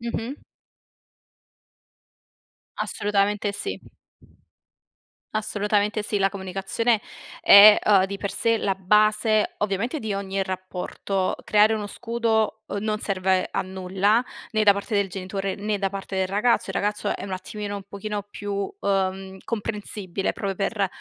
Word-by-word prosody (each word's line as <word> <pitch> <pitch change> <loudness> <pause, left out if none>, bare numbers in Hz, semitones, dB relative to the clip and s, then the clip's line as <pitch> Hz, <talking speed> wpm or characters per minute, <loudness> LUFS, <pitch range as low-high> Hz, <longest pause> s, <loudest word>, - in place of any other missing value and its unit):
Mh-mh. 235 +3 -5 2.3
Assolutamente 205 0 0
sì. 400 - -3 1.5
Assolutamente 210 0 0
sì, 210 -1 0
la 195 0 +3
comunicazione 195 +4 -1 0.4
è 205 +1 +9
uhm 200 -3 +5
di 200 0 -6
per 200 - -3
sé 230 -1 +2
la 195 -1 0
base 215 +3 +3
ovviamente 210 +8 -1
di 220 -6 -3
ogni 195 0 -2
rapporto. 185 0 -3
Creare 210 +1 +4
uno 210 -1 -3
scudo 225 0 -1
uhm - - -24
non 215 0 -1
serve 190 -2 0
a - - -1
nulla 190 +4 +1 0.3
né 215 0 +2
da 205 - +7
parte 200 +2 -4
del 200 -1 +2
genitore 195 +1 -4
né 210 0 -2
da 195 0 0
parte 195 -1 -6
del 190 0 +1
ragazzo. 210 +5 +1
Il - - -6
ragazzo 210 +1 -1
è - - -7
un 195 - -6
attimino 205 +2 -5
un 200 - -7
pochino 205 +1 -4
più 205 0 -7 0.3
uhm 190 -1 -1
comprensibile 205 -4 -3
proprio 195 -2 -3
per 200 +1 0
205 Hz, 135 wpm, -24 LUFS, 195-215 Hz, 2.3 s, è